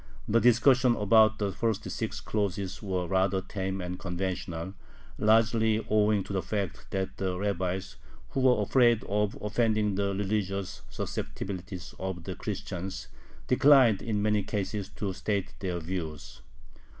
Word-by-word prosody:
The 115 +2 +4
discussion 120 +1 +5
about 110 +1 +5
the 100 -2 -1
first 110 0 -1
six 110 -2 -3
clauses 100 -3 -2
was 95 -4 -2
rather 95 +1 +2
tame 95 0 -4
and 90 0 -5
conventional, 90 -1 -4 0.5
largely 110 0 +3
owing 105 -1 +3
to 100 - -7
the 95 - 0
fact 90 - -4
that 95 0 -3
the 95 -2 -2
rabbis, 95 -1 -2 0.3
who - - -2
were 125 -5 +4
afraid 120 0 +4
of 105 0 0
offending 110 -1 +1
the 100 0 0
religious 100 -2 -2
susceptibilities 90 -2 -5
of 95 -2 -4
the - - -4
Christians, 95 +2 -5 0.4
declined 130 -5 +5
in 105 -3 -1
many 105 -1 +2
cases 100 0 -3
to 100 -2 -4
state 100 0 -2
their 90 -3 -2
views. 80 -4 -6
100 Hz, 140 wpm, -29 LUFS, 95-110 Hz, 0.5 s, discussion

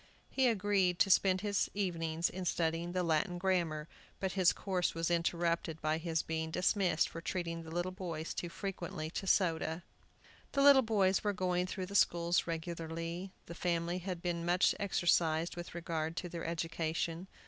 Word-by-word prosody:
He 265 -1 +3
agreed 200 -5 +2
to 195 - +4
spend 185 0 +4
his 205 -2 0
evenings 170 -4 0
in 185 0 -5
studying 165 0 0
the 185 -1 0
Latin 170 +2 +1
grammar; 170 -5 0 0.3
but 190 -1 -1
his 185 -3 +4
course 185 -4 -1
was 165 +1 -1
interrupted 170 -1 0
by 155 0 0
his 165 -1 -1
being 160 0 -2
dismissed 180 0 +2
for 165 - -8
treating 165 -1 -3
the 160 - -10
little 175 +2 -2
boys 170 -4 -5
too 175 - -4
frequently 170 -4 -5
to 195 - -4
soda. 165 -3 +1 0.7
The 275 - +3
little 280 -1 +8
boys 200 -5 +2
were 205 -1 +1
going 180 -1 0
through 185 0 -4
the 200 - -9
schools 175 -3 +3
regularly. 165 +2 -4
The 170 - -8
family 170 0 -1
had 180 -1 -5
been 170 -1 -1
much 175 +2 +3
exercised 170 -4 +2
with 175 -1 -7
regard 165 -2 -3
to 180 - -3
their 170 -1 -5
education. 165 +1 -2
175 Hz, 170 wpm, -34 LUFS, 165-185 Hz, 0.7 s, little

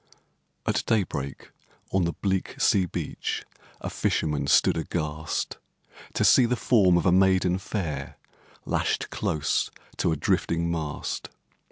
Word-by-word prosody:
At - - +1
day 110 -3 +3
break, 70 -5 -6 0.4
on 95 -2 +2
the 85 - -1
bleak 95 -2 -2
sea 95 -2 +3
beach - - -4 0.4
A - - -3
fisherman 75 -3 0
stood 75 +2 +5
aghast, 80 -1 -3 0.6
To - - +2
see 125 - +6
the 125 - +1
form 100 -7 +4
of 85 - 0
a 90 - +5
maiden 95 -1 +3
fair 95 -5 -4 0.5
Lashed - - -1
close 75 -1 0 0.3
to 85 - +1
a - - +1
drifting 85 +3 0
mast. 80 -3 -3
85 Hz, 135 wpm, -26 LUFS, 80-95 Hz, 0.6 s, see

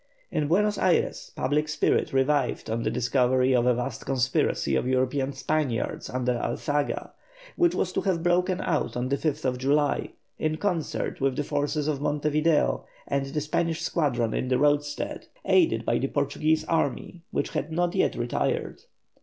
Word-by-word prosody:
In 150 -1 0
Buenos 205 +6 +2
Ayres 185 -2 +1
public 150 +3 0
spirit 150 - +1
revived 135 -3 +1
on 115 +1 -1
the - - 0
discovery 130 +1 +2
of 125 -1 +3
a 125 - +4
vast 125 0 -4
conspiracy 125 - +1
of 95 - 0
European 130 +1 +1
Spaniards 140 -2 -2
under 125 -1 -1
Alzaga, 145 -1 -2 0.4
which 345 -1 +3
was 185 - -1
to - - 0
have 180 -4 0
broken 180 +1 +2
out 150 -7 -1
on 125 +1 -1
the 140 - +2
5th 140 -4 -1
July, 145 +2 +1 0.3
in 155 0 0
concert 175 -9 -2
with 135 -1 +1
the 145 - -1
forces 145 +1 -1
in 145 -3 -1
Monte 150 0 0
Video 155 +1 +2 0.2
and 140 -1 -1
the 150 +2 -2
Spanish 160 +2 -1
squadron 125 -10 0
in - - -1
the 130 0 +2
roadstead, 145 0 0 0.2
aided 350 -3 +3
by - - +1
the - - 0
Portuguese 155 +1 0
army, 165 +2 -1
which - - -1
had 160 - -3
not 175 +2 0
yet - - +1
retired. 120 0 -2
145 Hz, 165 wpm, -26 LUFS, 130-155 Hz, 0.4 s, a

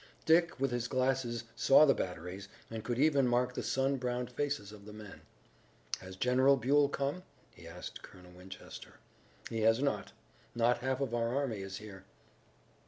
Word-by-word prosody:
Dick, 170 -1 +3
with 135 -1 +1
his 120 -1 -1
glasses, 130 -2 0
saw 135 +5 +6
the 135 - +5
batteries, 90 +1 -5 0.2
and 110 -1 -5
could 120 +1 -2
even 140 -2 +4
mark 125 +1 +1
the - - -3
sun 135 +1 0
browned 125 -1 -3
faces 135 -6 -2
of 105 -1 -13
the 105 - -10
men. 105 -2 -11 0.8
"Has 95 0 -10
General 130 +6 +4
Buell 140 +3 +3
come?" 140 +5 -2 0.3
he - - -13
asked - - -8
Colonel 90 -1 -14
Winchester. 90 +2 -11 0.6
"He 115 -1 -2
has 110 +2 +4
not. 140 0 -1 0.4
Not 120 +1 +3
half 130 +2 -1
of 130 -4 -2
our 120 +1 0
army 130 -8 -1
is 95 0 -6
here." 100 -2 -11
120 Hz, 170 wpm, -33 LUFS, 105-135 Hz, 0.8 s, saw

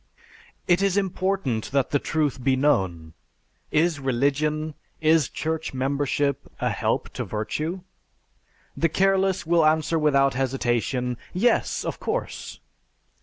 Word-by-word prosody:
"It 175 +1 +4
is 195 -1 +2
important 185 - -1
that 140 -2 +1
the 145 - +3
truth 145 -5 -1
be 130 0 +3
known. 95 - 0 0.6
Is 160 0 +2
religion, 145 +4 0 0.3
is 160 -2 +3
church 160 -2 -3
membership, 140 +1 -1
a - - 0
help - - -1
to - - -3
virtue? 155 - -3 0.9
The 165 - +1
careless 190 +1 +2
will 170 0 +3
answer 155 +1 +2
without 140 -2 +3
hesitation, 125 -1 -1 0.2
Yes! 235 +6 +1
of - - -4
course. - - -4
150 Hz, 120 wpm, -25 LUFS, 130-165 Hz, 0.9 s, It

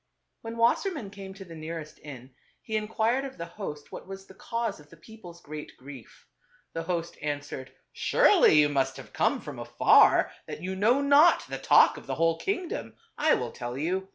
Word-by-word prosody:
When 225 0 -7
Wassermann 235 - +1
came 195 -1 -10
to 195 0 -10
the 170 - -11
nearest 160 -1 -7
inn, 130 -3 -11 0.3
he 220 - -4
inquired 220 +4 0
of 270 -1 -8
the 170 - -5
host 170 -5 -8
what - - -9
was 195 0 -9
the 190 - -15
cause 230 -2 -4
of 145 0 -17
the 165 - -16
people's 175 -2 -13
great 150 0 -9
grief. 135 -3 -13 0.5
The 165 - -3
host 170 0 -4
answered, 145 -3 -5 0.2
" - - -51
Surely - - +5
you 150 - +5
must 140 -2 -1
have - - -12
come - - +1
from - - -8
afar, - - +4 0.2
that 160 - -7
you 190 +1 -3
know 230 +8 +3
not 290 +4 +5
the - - -5
talk - - +5
of - - -12
the - - -2
whole 165 0 +1
kingdom. 390 +3 -3 0.2
I 310 +1 +3
will 125 -2 -4
tell 120 +1 -6
you. 185 +6 -2
180 Hz, 195 wpm, -27 LUFS, 150-225 Hz, 0.5 s, Surely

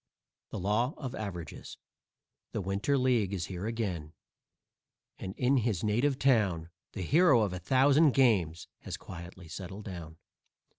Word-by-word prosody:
THE - - -5
LAW 110 - 0
OF 130 -4 -5
AVERAGES 90 -7 -6 0.8
_The - - -1
Winter 100 +9 0
League 120 -7 +2
is 85 -3 -2
here 95 +3 -5
again, 95 -10 -3 1.1
and 95 - -6
in 130 +2 +3
his 110 -7 0
native 120 +6 +2
town 100 -12 +2 0.2
The 95 - -4
hero 150 - +5
of 100 -4 0
a 90 - -4
thousand 135 - +4
games 95 - +2
has - - -6
quietly 85 0 -10
settled 95 +4 -7
down. 85 -5 -8
105 Hz, 140 wpm, -30 LUFS, 90-125 Hz, 1.1 s, hero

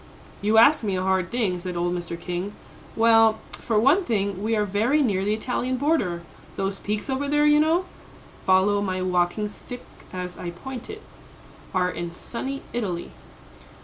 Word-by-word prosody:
"You 215 +2 +2
ask 240 +5 +6
me 200 -3 0
a 185 - -1
hard 190 -1 +1
thing," 210 -7 0
said 180 0 -5
old 175 +1 0
Mr. 170 -1 -4
King. 180 +3 -4 0.4
"Well, 225 -1 +5
for 220 -3 0
one 285 - +4
thing, 200 - -1
we 220 +2 +1
are 210 -1 +1
very 225 +10 +2
near 195 -6 +1
the 210 +2 +1
Italian 250 +3 -2
border; 245 - 0 0.3
those 195 0 -2
peaks 210 0 -3
over 270 +1 -1
there, 295 +1 +3
you 295 0 +6
know, 325 +4 +3 0.6
follow 190 +2 +3
my 185 -2 -1
walking 180 +3 +1
stick 245 +4 -9 0.3
as 180 -1 -6
I 175 - -4
point 245 +8 -8
it, 425 0 -8 0.7
are 180 -1 +1
in 175 -1 -4
sunny 265 +10 -5
Italy." 190 -8 -3
205 Hz, 170 wpm, -24 LUFS, 185-245 Hz, 0.7 s, ask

